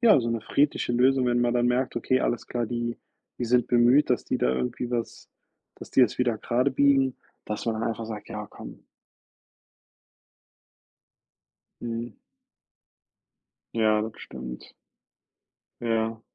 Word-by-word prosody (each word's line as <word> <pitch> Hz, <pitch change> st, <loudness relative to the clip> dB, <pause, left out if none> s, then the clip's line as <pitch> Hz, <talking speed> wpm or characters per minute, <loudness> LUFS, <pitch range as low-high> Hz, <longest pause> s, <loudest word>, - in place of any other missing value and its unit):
ja, 230 Hz, -, +6 dB
so 115 Hz, 0 st, -2 dB
'ne 115 Hz, -, -1 dB
friedliche 140 Hz, +2 st, +1 dB
Lösung, 130 Hz, +1 st, +3 dB
wenn 120 Hz, 0 st, +2 dB
man 120 Hz, 0 st, +1 dB
dann 120 Hz, 0 st, +2 dB
merkt: 125 Hz, 0 st, 0 dB
„Okay, 130 Hz, +2 st, +1 dB
alles 120 Hz, -, -1 dB
klar, 120 Hz, -2 st, -2 dB
die 120 Hz, 0 st, -3 dB, 0.4 s
die 120 Hz, -, -1 dB
sind 125 Hz, 0 st, +3 dB
bemüht, 125 Hz, +4 st, +4 dB
dass 125 Hz, -, +1 dB
die -, -, -1 dB
da 60 Hz, -, +2 dB
irgendwie 65 Hz, -, -3 dB
was 120 Hz, -2 st, -4 dB, 0.5 s
dass -, -, -11 dB
die 130 Hz, -, +5 dB
es 120 Hz, -, +1 dB
wieder 120 Hz, -3 st, +1 dB
gradebiegen“, 135 Hz, +1 st, +2 dB, 0.3 s
dass 105 Hz, +2 st, -4 dB
man 115 Hz, -, +1 dB
dann 115 Hz, -, 0 dB
einfach 115 Hz, 0 st, -4 dB
sagt: 110 Hz, -2 st, -7 dB
„Ja, -, -, -6 dB
komm.” -, -, -11 dB, 3.0 s
Mhm. 115 Hz, -1 st, -5 dB, 1.6 s
Ja, 110 Hz, -1 st, +3 dB
das 110 Hz, 0 st, -4 dB
stimmt. 60 Hz, 0 st, -9 dB, 1.1 s
Ja. 115 Hz, -1 st, -1 dB
120 Hz, 140 wpm, -26 LUFS, 115-125 Hz, 3.0 s, ja